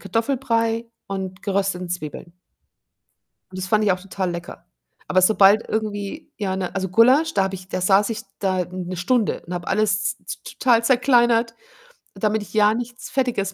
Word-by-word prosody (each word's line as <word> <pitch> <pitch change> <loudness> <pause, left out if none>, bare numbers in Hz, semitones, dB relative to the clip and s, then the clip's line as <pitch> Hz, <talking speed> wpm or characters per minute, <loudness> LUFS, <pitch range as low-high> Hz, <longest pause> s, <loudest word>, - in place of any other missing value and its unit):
Kartoffelbrei 230 -2 -1 0.2
und 190 -1 -5
gerösteten 195 -3 -1
Zwiebeln. 170 +1 -6 1.2
Und 185 - -9
das 185 -1 -4
fand 215 0 +2
ich 205 - +3
auch 185 - -1
total 190 -1 -3
lecker. 170 0 -8 0.4
Aber 185 - +3
sobald 205 +2 +5
irgendwie 215 +7 -4
ja 195 -3 -2
'ne 185 -2 -3
also, 190 -1 -2
Gulasch, 260 - +4
da 195 - +2
habe 190 0 -2
ich 185 0 -11
da - - -3
saß 195 +4 +3
ich 225 - -4 0.2
da 185 -2 0
1 185 0 -5
Stunde 215 +5 0
und 180 - -6
habe 175 -1 -5
alles 210 +1 +1
z - - -6
t - - -9
total 235 -3 +3
zerkleinert, 240 -2 +3 0.6
damit 215 0 0
ich 205 - -11
ja 210 0 +4
nichts 245 +1 -6
Fettiges 240 -7 -1
205 Hz, 175 wpm, -22 LUFS, 185-230 Hz, 1.2 s, sobald